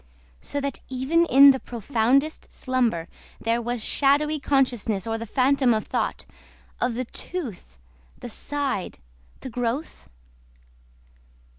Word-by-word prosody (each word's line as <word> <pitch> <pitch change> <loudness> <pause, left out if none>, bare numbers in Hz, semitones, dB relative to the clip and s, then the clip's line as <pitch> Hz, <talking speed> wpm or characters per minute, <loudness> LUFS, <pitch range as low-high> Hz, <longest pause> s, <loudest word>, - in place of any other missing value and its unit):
So 285 - -4
that 280 -1 -3
even 275 +7 +1
in 275 0 +8
profoundest 250 +6 0
slumber 240 -11 -1 0.3
There 230 +1 0
was 240 -1 -3
shadowy 295 +2 +2
consciousness 245 -7 0
or 225 0 -2
the 230 - -6
phantom 260 0 +3
of 215 - -2
thought - - -2 0.5
Of 245 -1 0
the 255 +2 -2
tooth, 235 - -7 0.4
the - - -8
side, 275 -4 -3 0.4
the - - -6
growth? 245 - -3
255 Hz, 115 wpm, -24 LUFS, 230-280 Hz, 0.5 s, in